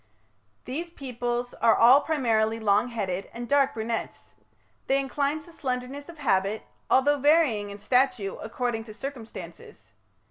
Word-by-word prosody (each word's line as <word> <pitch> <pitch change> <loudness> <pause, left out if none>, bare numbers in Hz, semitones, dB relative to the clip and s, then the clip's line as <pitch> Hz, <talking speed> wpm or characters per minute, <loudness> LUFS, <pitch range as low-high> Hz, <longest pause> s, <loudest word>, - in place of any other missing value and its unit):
These 320 +7 -4
peoples 245 -5 -4
are 230 -1 +5
all 255 +5 +7
primarily 225 -8 +1
long 210 +1 +3
headed 195 -6 -3
and 240 +1 -6
dark 280 0 +3
brunets. 225 0 -4 0.5
They 270 +1 +3
incline 280 +2 -1
to 340 - -14
slenderness 265 0 -4
of 335 - -11
habit, 210 -6 0 0.3
although 285 +2 +4
varying 275 -8 +3
in 200 - -8
stature 250 -2 +1
according 225 0 -3
to 215 -2 -11
circumstances. 255 -3 -9
245 Hz, 135 wpm, -26 LUFS, 220-280 Hz, 0.5 s, all